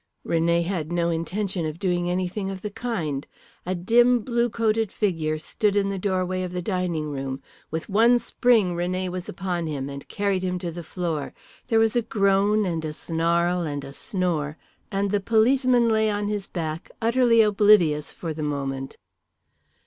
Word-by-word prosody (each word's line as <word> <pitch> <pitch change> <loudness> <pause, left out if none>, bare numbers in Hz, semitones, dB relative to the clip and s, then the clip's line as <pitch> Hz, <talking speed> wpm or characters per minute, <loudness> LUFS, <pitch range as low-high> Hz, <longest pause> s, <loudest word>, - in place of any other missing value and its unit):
René 170 +1 +2
had 170 -3 -3
no 170 -1 +1
intention 180 +2 -2
of 155 +1 -5
doing 175 -1 0
anything 185 +2 -2
of 190 -1 -6
the 210 - -4
kind. 195 - -3 0.4
A 185 - 0
dim, 240 +7 +4
blue 240 +1 0
coated 225 -2 0
figure 165 -7 0
stood 205 +6 -1
in 200 -1 +2
the 195 -1 -3
doorway 185 -1 -1
of 180 -1 -4
the 180 - -2
dining 175 -6 -1
room. 135 -1 -4 0.3
With 160 0 -4
one 230 +4 +5
spring 235 -5 +2
René 185 +2 -1
was 180 0 -5
upon 175 -2 -3
him, 140 -3 -3
and 140 0 -8
carried 200 -2 -1
him 180 -1 -1
to 175 -1 -4
the 170 +1 -7
floor. 165 -3 -3 0.3
There 230 -2 +2
was 225 +1 +3
a 240 - +3
groan 205 -1 +2
and 165 -3 -2
a 155 -1 -3
snarl 170 +2 0
and 145 -4 -3
a 140 0 -9
snore, 165 -6 -2 0.3
and 200 0 0
the 205 - +2
policeman 240 +3 +3
lay 220 -1 +3
on 205 0 -1
his 205 -2 -3
back 160 -2 -4
utterly 230 0 +4
oblivious 200 -8 +4
for 165 -2 -5
the 155 - -6
moment. 135 -2 -3
185 Hz, 175 wpm, -24 LUFS, 165-210 Hz, 0.4 s, one